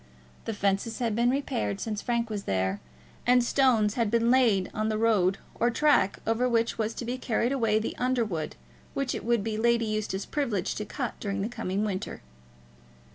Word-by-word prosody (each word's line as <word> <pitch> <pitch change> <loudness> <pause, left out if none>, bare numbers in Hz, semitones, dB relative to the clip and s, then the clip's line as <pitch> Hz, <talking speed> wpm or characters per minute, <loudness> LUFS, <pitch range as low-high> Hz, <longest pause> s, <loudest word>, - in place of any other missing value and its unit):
The 225 - -2
fences 200 +3 0
had 230 -4 -1
been 235 +2 +3
repaired 110 - -1
since 210 -2 -3
Frank 235 -2 -1
was 205 -2 -4
there, 95 +1 0 0.5
and 250 0 +5
stones 235 -5 +3
had 230 -3 0
been 235 +1 +3
laid 225 -8 +3
on 215 +1 -1
the 215 - 0
road 205 -4 +3 0.2
or 240 - +1
track 285 -6 +3
over 225 +3 +1
which 230 -1 +1
was 220 +1 -1
to 240 - -5
be 250 +2 -3
carried 240 0 0
away 225 -6 +2
the 220 - -2
under 250 -2 +1
wood 165 -7 -4 0.4
which 275 -2 -1
it - - -4
would 235 -2 +1
be 215 0 -2
Lady 235 0 +3
Eustace's 215 -2 -2
privilege 230 -11 -1
to 210 - -4
cut 245 +2 -4
during 200 -1 -2
the - - -1
coming 215 -4 -2
winter. 195 -2 -4
225 Hz, 190 wpm, -28 LUFS, 205-240 Hz, 0.5 s, and